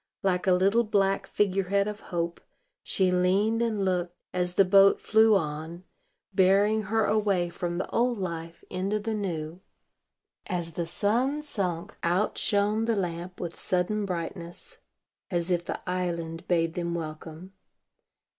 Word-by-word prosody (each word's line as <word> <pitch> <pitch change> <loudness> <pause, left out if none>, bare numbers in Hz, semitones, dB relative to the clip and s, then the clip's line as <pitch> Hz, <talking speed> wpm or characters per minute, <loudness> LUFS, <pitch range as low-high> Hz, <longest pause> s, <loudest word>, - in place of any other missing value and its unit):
Like 185 -1 +1
a 185 - +6
little 195 +6 +3
black 195 -3 +1
figure 195 -2 +1
head 200 +2 +1
of 210 0 -5
Hope, 170 -3 -3 0.4
she 185 -2 +1
leaned 195 +5 +2
and 215 -4 0
looked, 180 -1 -1 0.2
as 180 0 -1
the 195 - +5
boat 195 +1 +6
flew 220 0 +4
on, 160 +1 -3 0.5
bearing 200 +3 +4
her 220 0 +2
away 200 -5 +1
from 175 0 -3
the 185 - -2
old 240 0 +1
life 170 -3 -5
into 195 +3 -1
the 220 +1 -3
new. 175 -4 -4 0.9
As 175 -2 -2
the 170 +1 -3
sun 250 - 0
sunk, 190 - -3
out 180 +5 +1
shone 210 +1 +2
the 230 -1 +1
lamp 180 -1 -4
with 170 -1 -5
sudden 200 +3 0
brightness, 170 -1 -6 0.5
as 175 -2 -1
if 175 -1 +1
the - - -6
island 170 -2 -3
bade 165 -2 +1
them 170 -1 -2
welcome. 160 +2 -7
185 Hz, 145 wpm, -27 LUFS, 170-205 Hz, 0.9 s, a